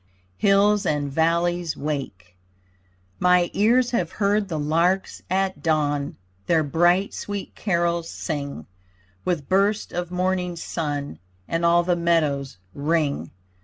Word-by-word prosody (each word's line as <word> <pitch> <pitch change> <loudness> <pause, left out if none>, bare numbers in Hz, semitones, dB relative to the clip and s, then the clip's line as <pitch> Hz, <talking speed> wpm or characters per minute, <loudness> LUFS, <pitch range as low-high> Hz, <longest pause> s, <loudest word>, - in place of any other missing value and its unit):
HILLS 205 +1 +4
AND 145 -2 0
VALLEYS 170 +2 +1
WAKE 135 -11 -5 0.8
My 180 -1 +3
ears 235 +4 +3
have 180 -9 -1
heard 205 0 +1
the 165 -4 -3
larks 165 +6 0
at 190 +1 0
dawn, 145 -3 0 0.3
Their 165 -2 +3
bright 175 +6 +2
sweet 205 -1 -5
carols 170 -3 0
sing, 140 -3 -5 0.6
With 160 -6 -1
burst 200 +3 +1
of 175 0 -3
morning 180 0 -1
sun 145 -3 -4 0.3
And 165 +1 -1
all 170 0 +4
the 175 0 +1
meadows 155 - 0 0.2
ring. 150 0 0
170 Hz, 120 wpm, -23 LUFS, 150-185 Hz, 0.8 s, HILLS